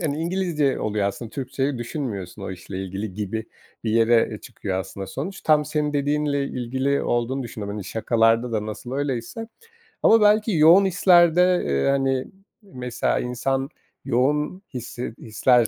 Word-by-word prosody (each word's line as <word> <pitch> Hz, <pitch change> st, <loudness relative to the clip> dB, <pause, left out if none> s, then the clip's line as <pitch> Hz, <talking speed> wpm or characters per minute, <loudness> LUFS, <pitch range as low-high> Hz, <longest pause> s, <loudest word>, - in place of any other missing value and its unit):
hani, 150 Hz, -4 st, -1 dB
İngilizce 165 Hz, -5 st, 0 dB
oluyor 105 Hz, -2 st, 0 dB
aslında 110 Hz, +3 st, -7 dB
Türkçeyi 135 Hz, 0 st, -2 dB
düşünmüyorsun 110 Hz, -, -5 dB
o -, -, -4 dB
işle 95 Hz, +1 st, -6 dB
ilgili 95 Hz, +1 st, -5 dB
gibi 105 Hz, +2 st, -3 dB, 0.4 s
bir 110 Hz, -, 0 dB
yere, 115 Hz, +1 st, +4 dB
e -, -, -7 dB
çıkıyor 95 Hz, -2 st, -4 dB
aslında 95 Hz, +1 st, -6 dB
sonuç. 185 Hz, +8 st, -5 dB
Tam 150 Hz, -1 st, +4 dB
senin 150 Hz, 0 st, -1 dB
dediğinle 145 Hz, 0 st, 0 dB
ilgili 130 Hz, +2 st, -1 dB
olduğunu 120 Hz, +3 st, -1 dB
düşündüm. 110 Hz, -4 st, -6 dB
Hani, 105 Hz, -1 st, -5 dB
şakalarda 115 Hz, +3 st, +2 dB
da 110 Hz, -1 st, -1 dB
nasıl 120 Hz, +4 st, -7 dB
öyleyse 140 Hz, -, -3 dB, 0.6 s
ama 225 Hz, 0 st, +6 dB
belki 210 Hz, +1 st, +4 dB
yoğun 170 Hz, +6 st, +7 dB
hislerde, 180 Hz, -1 st, +4 dB
eee, 70 Hz, -, +1 dB
hani, 135 Hz, -1 st, +1 dB, 0.4 s
mesela, 125 Hz, -, -2 dB
insan 135 Hz, +2 st, -1 dB, 0.4 s
yoğun 150 Hz, +9 st, +1 dB
hissi 120 Hz, -1 st, -5 dB
hisler, 115 Hz, +2 st, +3 dB
130 Hz, 145 wpm, -23 LUFS, 110-150 Hz, 0.6 s, yoğun